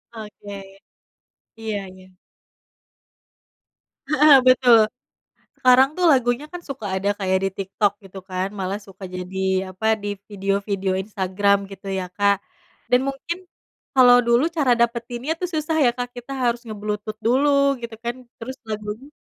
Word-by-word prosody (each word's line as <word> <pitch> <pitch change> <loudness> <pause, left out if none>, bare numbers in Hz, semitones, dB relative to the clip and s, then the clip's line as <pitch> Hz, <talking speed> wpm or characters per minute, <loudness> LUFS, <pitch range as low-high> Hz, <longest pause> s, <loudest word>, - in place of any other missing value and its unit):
Oke, 210 -2 -9 1.0
iya 205 -3 -4
iya. 185 0 -16 2.0
Heeh, 305 -1 +6
betul. 250 -2 +7 0.8
Sekarang 255 +1 +6
tuh 360 - 0
lagunya 245 +1 +1
kan 355 - -6
suka 270 -8 -7
ada 195 +2 -1
kayak 190 -1 +1
di - - +2
TikTok 195 +1 0
gitu 190 0 -10
kan. 185 +1 -1
Malah 190 +2 -2
suka 195 -1 -13
jadi 180 +1 -6 0.3
apa 220 +4 -4 0.2
di 205 - -3 0.2
video-video 195 -1 -1
Instagram 200 0 +1
gitu 195 0 -11
ya, 190 -1 -2
Kak. 200 0 +3 0.5
Dan 250 0 +5
mungkin 330 +6 -4 0.6
kalo 250 -2 +7
dulu 235 +4 +4
cara 270 -5 +3
dapetinnya 235 +4 -1
tuh 360 - -1
susah 315 0 -1
ya 240 - +5
Kak, 245 0 -3
kita 245 +3 -8
harus 240 0 0
nge-Bluetooth 210 0 -5
dulu 280 +3 +3
gitu 230 -1 -6
kan 240 0 -1 0.2
terus 260 +3 -7
lagunya 215 +5 -5
220 Hz, 135 wpm, -22 LUFS, 200-255 Hz, 2.0 s, betul